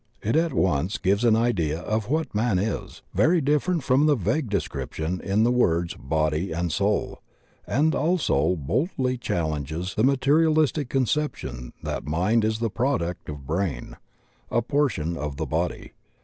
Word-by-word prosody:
It 110 Hz, +6 st, 0 dB
at 165 Hz, +1 st, +2 dB
once 95 Hz, -, +1 dB
gives 100 Hz, +3 st, +1 dB
an 115 Hz, -2 st, +5 dB
idea 90 Hz, -10 st, +1 dB
of 110 Hz, +4 st, -2 dB
what 160 Hz, +3 st, -1 dB
man 105 Hz, -2 st, +1 dB
is, 105 Hz, +4 st, -3 dB
very 170 Hz, +5 st, +4 dB
different 150 Hz, +3 st, +1 dB
from 135 Hz, +5 st, +3 dB
the 150 Hz, -, +4 dB
vague 115 Hz, -, -1 dB
description 90 Hz, -2 st, -3 dB
in 105 Hz, +2 st, +2 dB
the 120 Hz, -, +3 dB
words, 85 Hz, -9 st, +2 dB
"body 80 Hz, +5 st, -1 dB
and 85 Hz, +1 st, -1 dB
soul," -, -, 0 dB, 0.5 s
and 155 Hz, +5 st, +2 dB
also 140 Hz, -, +1 dB
boldly 130 Hz, -, -1 dB
challenges 80 Hz, -, -2 dB
the 110 Hz, -, 0 dB
materialistic 145 Hz, +1 st, +3 dB
conception 130 Hz, -, -2 dB
that -, -, -3 dB
mind 95 Hz, +9 st, +2 dB
is 110 Hz, 0 st, +1 dB
the 115 Hz, -1 st, -2 dB
product 95 Hz, -, -1 dB
of 75 Hz, -2 st, -7 dB
brain, 80 Hz, -4 st, -2 dB, 0.5 s
a 120 Hz, -, +1 dB
portion 120 Hz, -, 0 dB
of 75 Hz, -2 st, -4 dB
the 80 Hz, -, -2 dB
body. 65 Hz, -, -2 dB
110 Hz, 150 wpm, -25 LUFS, 80-135 Hz, 0.5 s, an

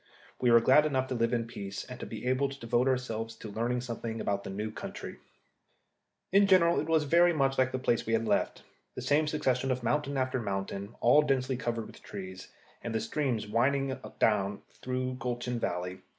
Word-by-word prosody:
We 125 Hz, -, +3 dB
were 115 Hz, 0 st, +7 dB
glad 150 Hz, +6 st, +5 dB
enough 130 Hz, -3 st, 0 dB
to -, -, -1 dB
live 115 Hz, -1 st, +1 dB
in 120 Hz, -2 st, 0 dB
peace, 100 Hz, -4 st, -6 dB
and -, -, -9 dB
to -, -, -6 dB
be -, -, -7 dB
able 130 Hz, +2 st, +1 dB
to 135 Hz, 0 st, -9 dB
devote 120 Hz, +2 st, +1 dB
ourselves 115 Hz, -4 st, -1 dB
to 110 Hz, -1 st, -9 dB
learning 120 Hz, +3 st, -1 dB
something 115 Hz, -2 st, -5 dB
about 100 Hz, -2 st, -1 dB
the -, -, -6 dB
new 105 Hz, +3 st, -4 dB
country. -, -, -7 dB, 1.1 s
In 200 Hz, +1 st, +5 dB
general 170 Hz, -3 st, +5 dB
it 155 Hz, -, -3 dB
was 160 Hz, -1 st, +3 dB
very 170 Hz, +4 st, +4 dB
much 135 Hz, -3 st, +1 dB
like 130 Hz, 0 st, +3 dB
the 130 Hz, -, -1 dB
place 120 Hz, -2 st, +1 dB
that -, -, -8 dB
we 115 Hz, -, 0 dB
had 115 Hz, 0 st, +2 dB
left -, -, 0 dB, 0.3 s
the -, -, -5 dB
same 150 Hz, +2 st, +2 dB
succession 135 Hz, -4 st, 0 dB
of 125 Hz, -1 st, -1 dB
mountain 140 Hz, +3 st, 0 dB
after 130 Hz, -1 st, 0 dB
mountain, 100 Hz, 0 st, -4 dB
all 125 Hz, +6 st, +6 dB
densely 135 Hz, -2 st, 0 dB
covered 115 Hz, -2 st, -3 dB
with -, -, -13 dB
trees, 95 Hz, -2 st, -8 dB, 0.3 s
and 115 Hz, -1 st, -4 dB
with 110 Hz, -, 0 dB
the -, -, -3 dB
streams 125 Hz, -6 st, -1 dB
winding 130 Hz, +5 st, +1 dB, 0.2 s
down 100 Hz, -2 st, +1 dB
through 130 Hz, 0 st, -3 dB
gulch 120 Hz, 0 st, -3 dB
and 125 Hz, -2 st, -2 dB
valley. 90 Hz, +1 st, -3 dB
125 Hz, 210 wpm, -30 LUFS, 110-135 Hz, 1.1 s, were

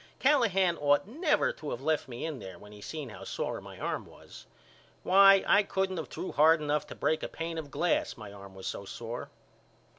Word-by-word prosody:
Callahan 200 Hz, -, +3 dB
ought 145 Hz, +5 st, +3 dB
never 305 Hz, -, +1 dB
to 150 Hz, -, -7 dB
of 120 Hz, -, -4 dB
left 155 Hz, +2 st, 0 dB
me 120 Hz, +2 st, -6 dB
in 155 Hz, -5 st, -4 dB
there 95 Hz, -3 st, -9 dB
when 105 Hz, -, -14 dB
he 105 Hz, 0 st, -12 dB
seen 150 Hz, +2 st, -6 dB
how 105 Hz, -, -10 dB
sore -, -, -4 dB
my -, -, -11 dB
arm -, -, -3 dB
was. -, -, -14 dB, 0.6 s
Why, 195 Hz, +1 st, +7 dB
I 200 Hz, -, +5 dB
couldn't 190 Hz, -2 st, -1 dB
of 160 Hz, -, -5 dB
threw -, -, -6 dB
hard 160 Hz, +2 st, +5 dB
enough 150 Hz, 0 st, -1 dB
to -, -, -9 dB
break 160 Hz, -, 0 dB
a -, -, -3 dB
pain 165 Hz, 0 st, -5 dB
of 150 Hz, -3 st, -7 dB
glass 170 Hz, +5 st, 0 dB
my 105 Hz, -3 st, -9 dB
arm 100 Hz, -1 st, -12 dB
was 95 Hz, -, -10 dB
so -, -, -4 dB
sore. 115 Hz, +4 st, -7 dB
155 Hz, 210 wpm, -30 LUFS, 120-190 Hz, 0.6 s, Why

